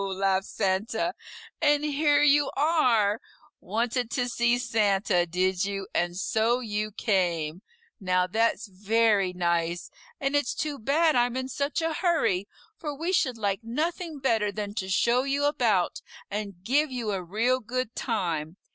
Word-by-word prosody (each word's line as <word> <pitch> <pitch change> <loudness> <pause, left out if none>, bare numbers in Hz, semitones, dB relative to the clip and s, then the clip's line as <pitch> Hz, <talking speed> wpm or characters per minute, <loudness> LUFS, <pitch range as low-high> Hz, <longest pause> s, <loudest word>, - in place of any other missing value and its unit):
laughed 195 0 0
Santa, 220 - -1 0.5
"and 295 -1 +3
here 295 0 +3
you 290 -1 +4
are! 245 -9 +3 0.4
Wanted 230 +4 -1
to 245 +1 -1
see 240 0 +2
Santa, 200 -6 +1
did 185 +2 0
you, 195 -1 -3
and 175 0 0
so 225 +5 +1
you 215 -3 -2
came! 175 -6 0 0.4
Now 185 -2 +1
that's 225 +2 0
very 205 0 +2
nice, 170 -1 -1 0.3
and 275 -1 0
it's 285 -4 +1
too 290 -2 -3
bad 305 +7 +2
I'm 245 0 +2
in 260 0 -2
such 285 +4 -2
a 325 0 0
hurry, 230 - +1 0.3
for 300 -4 -4
we 340 +5 -2
should 255 -9 +1
like 200 -3 -1
nothing 315 +7 -3
better 225 -6 +1
than 205 0 -5
to 190 -3 -4
show 235 +6 +3
you 275 +2 0
about 235 - +1 0.3
and 200 -3 -5
give 285 +7 +2
you 240 -4 -2
a 195 -2 -2
real 225 +8 0
good 250 0 -3
time. 170 - -2
225 Hz, 150 wpm, -27 LUFS, 195-275 Hz, 0.5 s, you